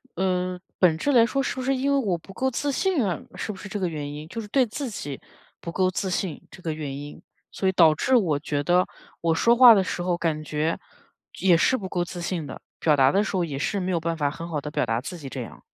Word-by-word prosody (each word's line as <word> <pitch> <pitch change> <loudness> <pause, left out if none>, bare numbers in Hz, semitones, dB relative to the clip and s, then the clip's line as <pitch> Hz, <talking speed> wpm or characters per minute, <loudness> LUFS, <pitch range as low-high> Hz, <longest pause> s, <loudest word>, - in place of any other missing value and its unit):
嗯， 180 0 -1 0.2
本 170 -4 +4
质 285 - 0
来 235 -3 +6
说 275 +3 0
是 - - -2
不 260 - -4
是 270 +1 +1
因 270 +2 0
为 280 - +3
我 200 -10 0
不 195 +4 -14
够 265 +6 0
自 285 +4 -1
信 330 - +1
啊？ 175 -5 -1 0.2
是 215 - -4
不 195 - -9
是 200 - -9
这 205 - -3
个 185 - 0
原 150 -3 -4
因， 150 +1 -8
就 230 - -5
是 210 - -9
对 255 +4 +3
自 255 +4 -5
己 145 -10 -6 0.4
不 170 - -6
够 185 +1 +2
自 190 0 -2
信 180 -2 -2
这 180 - -14
个 160 - -2
原 145 -3 -5
因。 145 +1 -9 0.3
所 190 - -1
以 - - +4
导 165 -4 +6
致 255 - +1
我 165 -11 +2
觉 145 -1 -2
得 180 +3 +3 0.3
我 165 -1 +1
说 235 +7 +4
话 245 -2 +10
的 195 -2 +3
时 180 - -3
候 175 -1 0
感 160 -3 -1
觉 155 +2 -1 0.6
也 180 -3 +5
是 260 - +3
不 190 -2 -6
够 175 -1 -1
自 175 0 -7
信 170 -3 -3
的， - - -9 0.2
表 155 -2 +3
达 135 -1 +5
的 200 - +3
时 210 - -3
候 180 - +2
也 140 -4 -4
是 200 +6 -1
没 185 - -1
有 170 - +1
办 165 0 -2
法 145 -2 0
很 165 +2 -7
好 155 -4 -3
地 150 - -6
表 - - 0
达 115 +1 -1
自 175 +5 -7
己 145 -4 -8
这 130 - -5
样。 120 - -9
180 Hz, 295 characters per minute, -25 LUFS, 155-205 Hz, 0.6 s, 话